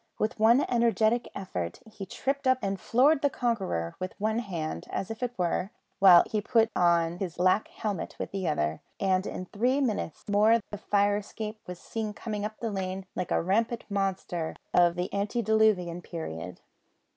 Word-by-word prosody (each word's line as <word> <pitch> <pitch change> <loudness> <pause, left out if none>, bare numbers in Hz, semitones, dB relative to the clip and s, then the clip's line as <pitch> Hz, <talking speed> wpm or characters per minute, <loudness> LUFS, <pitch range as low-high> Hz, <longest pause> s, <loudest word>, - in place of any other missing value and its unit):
With 215 +1 -1
one 235 +6 +5
energetic 235 0 +2
effort 90 - -4
he 210 -3 -9
tripped 265 +5 -2
up 260 0 +5
and 195 -1 -1
floored 275 - +3
the 285 - +3
conqueror 195 - -2
with 185 0 -5
one 220 +2 0
hand, 165 - -4
as 195 - -3
it 240 +2 -3
were, 180 +1 0 0.3
while 185 -3 +9
he 215 - -2
put 225 +1 +2
on 170 -1 +2
his 180 -4 -4
black 185 +4 +2
helmet 205 -6 -4
with - - -5
the 195 -2 -2
other, 80 - -1 0.2
and 190 -1 +1
in 185 - -5
three 245 +9 +1
minutes 220 - -2
more 215 +3 +4
the 205 - -5
fire 205 0 +2
escape 215 +1 -6
was 180 0 -6
seen 215 +3 -4
coming 210 -1 -4
up 215 +1 -4
the 230 -2 -2
lane 190 -1 -3
like 180 - -3
a - - +1
rampant 225 +6 0
monster 190 -4 -2 0.2
of 175 -1 +5
the 180 +1 -3
antediluvian 205 -4 +1
period. 90 - -7
200 Hz, 170 wpm, -28 LUFS, 180-225 Hz, 0.3 s, while